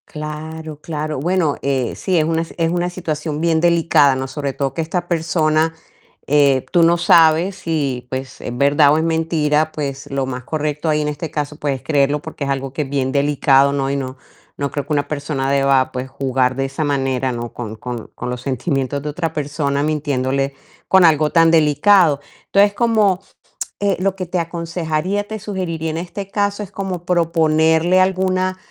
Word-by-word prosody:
Claro, 155 Hz, 0 st, -7 dB
claro. 155 Hz, -2 st, -4 dB
Bueno, 170 Hz, -1 st, +1 dB, 0.4 s
sí, 185 Hz, -2 st, 0 dB
es 155 Hz, -, +3 dB
una 165 Hz, 0 st, 0 dB
es 165 Hz, 0 st, -2 dB
una 175 Hz, 0 st, 0 dB
situación 155 Hz, -4 st, -4 dB
bien 165 Hz, -1 st, +2 dB
delicada, 165 Hz, -5 st, +4 dB
¿no? 130 Hz, 0 st, -3 dB
Sobre 140 Hz, +1 st, -3 dB
todo 135 Hz, -1 st, -2 dB
que 165 Hz, -, -2 dB
esta 175 Hz, +2 st, -3 dB
persona, 160 Hz, -1 st, +1 dB, 0.5 s
eh, 140 Hz, -2 st, +3 dB
tú 175 Hz, -, +4 dB
no 170 Hz, +1 st, +4 dB
sabes 170 Hz, +2 st, +4 dB
si, 140 Hz, -8 st, -2 dB
pues, 130 Hz, 0 st, -6 dB
es 120 Hz, -, -5 dB
verdad 145 Hz, +2 st, +4 dB
o -, -, +3 dB
es 160 Hz, -, +1 dB
mentira, 160 Hz, -2 st, +1 dB
pues 145 Hz, -2 st, -5 dB
lo 135 Hz, -1 st, -1 dB
más 130 Hz, -1 st, -5 dB
correcto 150 Hz, +2 st, -2 dB
ahí, 150 Hz, 0 st, +2 dB
en 150 Hz, -, -1 dB
este 150 Hz, +2 st, -4 dB
caso 150 Hz, 0 st, -3 dB
pues 145 Hz, -2 st, -1 dB
es -, -, -18 dB
creerlo, 145 Hz, -1 st, +2 dB
porque 160 Hz, -2 st, -7 dB
es 140 Hz, -, -2 dB
algo 135 Hz, -1 st, -2 dB
que 150 Hz, -, -2 dB
es 135 Hz, -, -9 dB
bien 135 Hz, -2 st, -1 dB
delicado, 140 Hz, -1 st, +3 dB
¿no? 135 Hz, -1 st, -1 dB
Y 140 Hz, -, -1 dB
no 130 Hz, -1 st, -4 dB, 0.4 s
no 140 Hz, -1 st, -2 dB
creo 145 Hz, 0 st, -4 dB
que 150 Hz, -, -2 dB
una 145 Hz, -1 st, 0 dB
persona 145 Hz, -2 st, -2 dB
deba, 135 Hz, -1 st, +2 dB
pues, 125 Hz, +1 st, -4 dB
jugar 130 Hz, -1 st, 0 dB
de 135 Hz, +1 st, -1 dB
esa 135 Hz, +3 st, -3 dB
manera, 135 Hz, -3 st, 0 dB
¿no? 120 Hz, -1 st, -5 dB
Con 110 Hz, -3 st, -6 dB
con 120 Hz, 0 st, -6 dB
con -, -, -5 dB
los 125 Hz, 0 st, -4 dB
sentimientos 135 Hz, +1 st, -2 dB
de 150 Hz, -, -4 dB
otra 160 Hz, +1 st, -3 dB
persona, 145 Hz, -1 st, -1 dB
mintiéndole 140 Hz, -3 st, -1 dB, 0.3 s
con 190 Hz, -2 st, +6 dB
algo 155 Hz, -2 st, +4 dB
tan 165 Hz, -1 st, +5 dB
delicado. 160 Hz, +1 st, +4 dB, 0.3 s
Entonces, 200 Hz, +1 st, +4 dB
como 210 Hz, -4 st, +2 dB, 0.6 s
eh, 200 Hz, -2 st, +1 dB
lo 190 Hz, +1 st, 0 dB
que 185 Hz, -1 st, -4 dB
te 180 Hz, +1 st, -2 dB
aconsejaría, 170 Hz, +3 st, -2 dB
te 220 Hz, 0 st, -5 dB
sugeriría 180 Hz, -6 st, -3 dB
en 160 Hz, -, -4 dB
este 190 Hz, +3 st, -6 dB
caso, 205 Hz, 0 st, -1 dB
es 200 Hz, -, -10 dB
como 190 Hz, -3 st, -4 dB
proponerle 165 Hz, 0 st, +3 dB
alguna 185 Hz, 0 st, +1 dB
155 Hz, 190 wpm, -19 LUFS, 140-170 Hz, 0.6 s, con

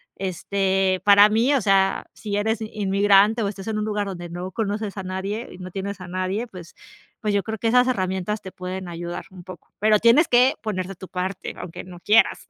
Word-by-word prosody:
este 190 Hz, 0 st, 0 dB
para 205 Hz, 0 st, +8 dB
mí, 235 Hz, +7 st, +3 dB
o 265 Hz, -, +2 dB
sea, 195 Hz, -1 st, +2 dB
si 205 Hz, -2 st, -5 dB
eres 220 Hz, +2 st, 0 dB
inmigrante 205 Hz, +1 st, +3 dB
o 205 Hz, -, 0 dB
estás 195 Hz, -1 st, -6 dB
en 215 Hz, -1 st, -1 dB
un 210 Hz, -, -1 dB
lugar 210 Hz, -1 st, -1 dB
donde 175 Hz, -3 st, -6 dB
no 175 Hz, +2 st, -6 dB
conoces 210 Hz, 0 st, -3 dB
a -, -, -2 dB
nadie 190 Hz, +5 st, -4 dB
y -, -, -11 dB
no 185 Hz, 0 st, -8 dB
tienes 200 Hz, +1 st, -5 dB
a 180 Hz, -, -8 dB
nadie, 185 Hz, +5 st, -2 dB
pues 180 Hz, -6 st, -12 dB, 0.4 s
pues 210 Hz, -1 st, -1 dB
yo 200 Hz, -, +2 dB
creo 220 Hz, 0 st, -4 dB
que 225 Hz, +2 st, 0 dB
esas 250 Hz, +2 st, +4 dB
herramientas 190 Hz, -2 st, -1 dB
te 190 Hz, -, -8 dB
pueden 185 Hz, 0 st, -6 dB
ayudar 175 Hz, 0 st, -6 dB
un 185 Hz, -2 st, -12 dB
poco, 185 Hz, -1 st, -12 dB
pero 215 Hz, +1 st, +4 dB
tienes 240 Hz, +8 st, +5 dB
que 250 Hz, +2 st, +5 dB
poner 185 Hz, -4 st, -3 dB
de 195 Hz, -, -7 dB
tu 190 Hz, -, -10 dB
parte, 185 Hz, +1 st, -4 dB
aunque 170 Hz, -, -8 dB
no 180 Hz, -1 st, -11 dB
quieras. 210 Hz, +4 st, +3 dB
195 Hz, 215 wpm, -23 LUFS, 185-215 Hz, 0.4 s, para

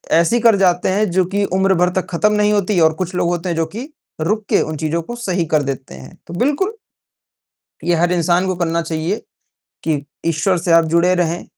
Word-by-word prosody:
ऐसी 170 Hz, +9 st, +3 dB
कर 230 Hz, -2 st, +5 dB
जाते 180 Hz, -1 st, +2 dB
हैं 205 Hz, +1 st, +1 dB
जो 185 Hz, +1 st, +3 dB
कि 200 Hz, 0 st, +1 dB
उम्र 190 Hz, 0 st, +3 dB
भर 180 Hz, +1 st, +2 dB
तक -, -, -5 dB
खत्म 210 Hz, +5 st, +1 dB
नहीं 210 Hz, 0 st, +2 dB
होती 200 Hz, -2 st, +1 dB
और 160 Hz, 0 st, +4 dB
कुछ 185 Hz, +1 st, -3 dB
लोग 175 Hz, -, +1 dB
होते 175 Hz, +1 st, -2 dB
हैं 170 Hz, -, -1 dB
जो 165 Hz, 0 st, 0 dB
कि 250 Hz, +6 st, -5 dB, 0.3 s
रुक 215 Hz, +6 st, -1 dB
के -, -, +3 dB
उन 155 Hz, -1 st, -3 dB
चीज़ों 160 Hz, +2 st, -1 dB
को 240 Hz, +9 st, -7 dB
सही 185 Hz, -7 st, -1 dB
कर 150 Hz, -, +2 dB
देते 135 Hz, -, -5 dB
हैं। 65 Hz, 0 st, -12 dB
तो 170 Hz, -, -8 dB
बिल्कुल 295 Hz, -, +1 dB, 1.1 s
ये 175 Hz, -, +2 dB
हर 175 Hz, +2 st, +2 dB
इंसान 175 Hz, +2 st, +2 dB
को 185 Hz, -, 0 dB
करना 170 Hz, -1 st, 0 dB
चाहिए 165 Hz, +4 st, -2 dB, 0.7 s
कि 150 Hz, -3 st, -1 dB, 0.2 s
ईश्वर 165 Hz, +3 st, +1 dB
से 170 Hz, 0 st, 0 dB
आप 165 Hz, 0 st, +6 dB
जुड़े 175 Hz, +2 st, +4 dB
रहें। 175 Hz, -1 st, -1 dB
175 Hz, 220 wpm, -18 LUFS, 165-195 Hz, 1.1 s, आप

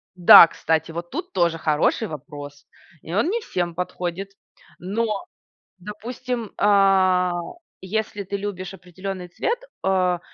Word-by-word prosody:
Да, 175 Hz, -1 st, +10 dB
кстати, 160 Hz, 0 st, -1 dB
вот 170 Hz, +1 st, -6 dB
тут -, -, -5 dB
тоже 170 Hz, -3 st, +1 dB
хороший 155 Hz, +8 st, +1 dB
вопрос. 145 Hz, -2 st, -10 dB, 0.3 s
И 165 Hz, -, -8 dB
он 225 Hz, -, +1 dB
не 465 Hz, +3 st, 0 dB
всем 175 Hz, -, -3 dB
подходит. 180 Hz, +2 st, -4 dB, 0.5 s
Но, 210 Hz, -, -2 dB, 0.5 s
допустим, 230 Hz, +3 st, -6 dB
а, 190 Hz, -3 st, +4 dB, 0.5 s
если 210 Hz, +1 st, -3 dB
ты 200 Hz, +2 st, -4 dB
любишь 195 Hz, -2 st, -5 dB
определенный 185 Hz, 0 st, -7 dB
цвет, 465 Hz, -, -2 dB, 0.2 s
а, 185 Hz, -2 st, +1 dB
185 Hz, 120 wpm, -23 LUFS, 175-205 Hz, 0.5 s, Да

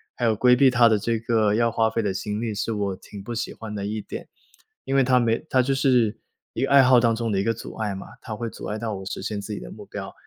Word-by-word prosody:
还 -, -, -5 dB
有 110 Hz, -1 st, +3 dB
规 125 Hz, +3 st, +5 dB
避 135 Hz, +1 st, +5 dB
它 120 Hz, -2 st, +5 dB
的 110 Hz, -2 st, +3 dB
这 115 Hz, +2 st, -1 dB
个 110 Hz, -2 st, +2 dB
要 115 Hz, 0 st, +2 dB
花 110 Hz, 0 st, +2 dB
费 115 Hz, +1 st, -1 dB
的 100 Hz, -2 st, 0 dB
心 105 Hz, +2 st, -3 dB
力 115 Hz, -2 st, -2 dB
是 105 Hz, +2 st, -2 dB
我 100 Hz, -2 st, -2 dB
挺 100 Hz, +1 st, -11 dB
不 120 Hz, -, -5 dB
喜 115 Hz, -, -3 dB
欢 110 Hz, -2 st, -8 dB
的 100 Hz, -1 st, -4 dB
一 110 Hz, +1 st, -3 dB
点。 -, -, -8 dB, 0.6 s
因 135 Hz, -, -2 dB
为 135 Hz, -, +5 dB
它 125 Hz, 0 st, +4 dB
没 115 Hz, +1 st, +1 dB
它 130 Hz, -2 st, +4 dB
就 135 Hz, +2 st, 0 dB
是 125 Hz, -5 st, +2 dB, 0.3 s
一 120 Hz, -, -2 dB
个 -, -, 0 dB
爱 140 Hz, -1 st, +8 dB
好 125 Hz, -1 st, +6 dB
当 115 Hz, -1 st, +2 dB
中 115 Hz, -1 st, -2 dB
的 95 Hz, -, +1 dB
一 95 Hz, -, +1 dB
个 115 Hz, -, +1 dB
阻 -, -, -9 dB
碍 105 Hz, -3 st, -2 dB
嘛， 95 Hz, -, -8 dB, 0.2 s
它 110 Hz, -3 st, -6 dB
会 115 Hz, +2 st, -4 dB
阻 -, -, -9 dB
碍 105 Hz, -, -3 dB
到 110 Hz, -1 st, -3 dB
我 95 Hz, -, -7 dB
实 -, -, -5 dB
现 105 Hz, 0 st, -3 dB
自 100 Hz, -, -8 dB
己 -, -, -5 dB
的 -, -, -9 dB
目 -, -, -10 dB
标， -, -, -7 dB
115 Hz, 320 characters per minute, -24 LUFS, 105-120 Hz, 0.6 s, 爱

